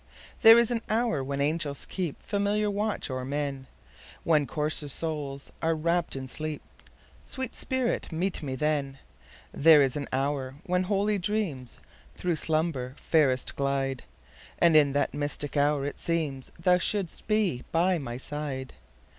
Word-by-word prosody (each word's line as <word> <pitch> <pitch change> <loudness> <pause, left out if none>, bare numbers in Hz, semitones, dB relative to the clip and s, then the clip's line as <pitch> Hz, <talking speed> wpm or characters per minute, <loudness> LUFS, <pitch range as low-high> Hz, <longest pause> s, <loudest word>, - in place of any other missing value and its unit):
There 225 +1 +10
is 235 0 +3
an 230 -2 0
hour 220 - +1
when 140 +1 -3
angels 145 -1 -1
keepFamiliar 200 +4 -1
watch 210 -7 -2
o'er 130 0 -3
men, 140 -1 -3 0.6
When 150 -4 +3
coarser 150 0 -2
souls 145 -3 -3
are 165 0 +1
wrapp'd 170 +1 0
in 130 -1 -5
sleep—Sweet 155 - -7
spirit, 260 -6 -1
meet 175 +4 -2
me 135 -4 -3
then! 140 -1 -1 0.6
There 160 0 +7
is 135 -3 +3
an 145 -2 -3
hour 135 0 -1
when 180 0 +1
holy 205 +1 +1
dreamsThrough 175 - -4
slumber 155 -5 -1
fairest 135 -6 +2
glide; 135 -2 -1 0.6
And 170 -2 +4
in 145 -3 +5
that 145 - 0
mystic 145 0 -2
hour 145 -1 +2
it 145 - -4
seemsThou 165 +3 0
shouldst 200 -4 -1
be 210 - +1
by 175 +1 +2
my 120 -4 -5
side. 135 -1 -5
150 Hz, 135 wpm, -28 LUFS, 140-180 Hz, 0.6 s, There